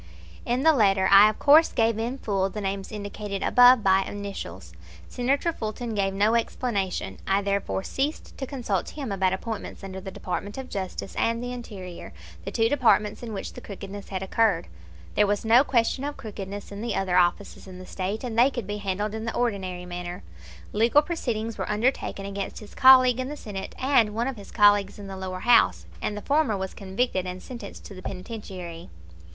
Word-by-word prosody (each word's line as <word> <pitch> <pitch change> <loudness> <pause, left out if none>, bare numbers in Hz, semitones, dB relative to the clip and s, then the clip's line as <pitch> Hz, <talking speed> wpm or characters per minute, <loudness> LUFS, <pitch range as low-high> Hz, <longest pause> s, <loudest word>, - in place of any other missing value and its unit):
In 245 +3 +1
the 320 0 +6
letter 195 -7 +3
I 200 +2 +9
of 215 - -4
course 305 +3 +6
gave 225 -1 +1
in 240 +4 -2
full 195 -6 -1
the 210 - -6
names 195 -1 -3
indicated 205 -1 -5
above 245 -2 +6
by 190 0 +5
initials. 190 - -7 0.3
Senator 275 +7 0
Fulton 225 -1 -4
gave 195 -2 0
no 205 +3 +2
explanation. 200 - -1
I 195 +1 +2
therefore 200 -1 -1
ceased 285 +8 -3
to 265 - -3
consult 235 -9 -2
him 275 -7 -6
about 190 -1 +1
appointments 215 +3 -5
under 190 -1 -6
the 190 - -7
Department 195 +3 -5
of 265 -1 -7
Justice 190 0 -5
and 230 +1 0
the 245 - -4
Interior, 190 - -8 0.3
the - - -3
two 225 0 +2
departments 225 -5 +2
in 235 -2 -6
which 200 - -5
the - - -9
crookedness 200 0 -8
had 190 -1 -3
occurred 195 -3 +2 0.5
there 210 - +3
was 205 +2 -1
no 235 +4 +6
question 255 0 +1
of 290 0 -4
crookedness 200 -2 -7
in 200 +1 -7
the 235 - -2
other 185 -2 0
offices 180 +3 +1
in 185 -1 -10
the 185 - -10
State, 195 +5 -4
and 230 -2 -2
they 250 +3 +6
could 240 -6 -5
be 205 +1 -4
handled 205 +1 -2
in 220 0 -4
the 230 - -3
ordinary 190 -7 -2
manner. 175 0 -6 0.5
Legal 230 +8 +4
proceedings 230 -10 -3
were - - -3
undertaken 210 -2 -1
against 200 0 -5
his 210 - -11
colleague 255 -1 +7
in 255 +1 -2
the 295 - -6
Senate, 195 -6 -7
and 250 -6 +3
one 235 +2 0
of 270 - -3
his 200 - -11
colleagues 205 -2 +4
in 205 - -9
the 195 0 -7
lower 185 -1 -5
house, 240 +2 +4 0.2
and 210 - -2
the 210 - -7
former 285 -7 +2
was 190 0 -4
convicted 190 -1 -2
and 180 0 -6
sentenced 235 -6 -9
to - - -9
the 185 - -10
penitentiary. 185 - -7
205 Hz, 195 wpm, -26 LUFS, 195-240 Hz, 0.5 s, I